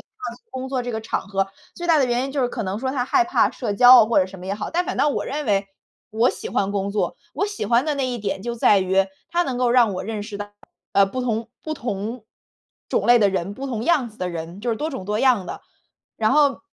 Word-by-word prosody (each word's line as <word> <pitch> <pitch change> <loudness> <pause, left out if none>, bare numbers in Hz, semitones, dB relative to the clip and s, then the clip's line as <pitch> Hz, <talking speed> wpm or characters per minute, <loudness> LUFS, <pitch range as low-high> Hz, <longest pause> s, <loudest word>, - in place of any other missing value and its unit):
去 420 - -9
工 260 0 -5
作 260 -1 -1
这 245 -1 -4
个 220 - -3
场 220 - -2
合， 195 -1 0 0.3
最 345 - -5
大 320 -2 +5
的 265 - +3
原 240 +1 0
因 275 - -4
就 285 - -1
是 - - +3
可 235 -2 -4
能 195 +2 -3
说 260 +1 -2
他 250 -3 0
害 355 +7 +3
怕 355 - +2
社 230 -5 -3
交 245 +4 +8
啊 215 - +1
或 230 - +3
者 185 - +1
什 190 0 -11
么 180 - -9
也 200 - -1
好。 210 - -5
但 355 +2 0
反 - - -3
倒 295 - +3
我 290 - -1
认 295 +3 -3
为， 200 -1 +1 0.4
我 225 +3 +3
喜 - - -7
欢 200 0 0
工 200 0 -1
作。 210 - -1 0.2
我 400 - 0
喜 410 0 -4
欢 240 +3 +3
的 305 - 0
那 270 -2 0
一 250 - -2
点 200 -2 -3
就 235 0 -3
在 210 -3 +4
于 190 +1 +2 0.2
它 345 +1 +2
能 260 -6 -3
够 250 -1 +2
让 240 -5 +4
我 185 - -4
认 215 -1 -4
识 205 -1 -7
到， 205 0 -5 0.4
呃， 200 0 +6
不 255 +6 -4
同 230 -2 -2 0.2
不 310 - -3
同 225 -2 -4 0.6
种 - - 0
类 240 0 +7
的 205 - +4
人， 190 +1 -2
不 275 - -6
同 230 -4 -3
样 300 -8 +2
子 215 - -19
的 180 - -2
人， 170 +2 -6
就 240 - -1
是 225 - -1
多 305 - -2
种 260 -9 -6
多 210 +2 -1
样 240 -9 +3
的。 - - -7 0.5
然 220 -1 +2
后 285 -2 +3
235 Hz, 295 characters per minute, -22 LUFS, 200-265 Hz, 0.6 s, 交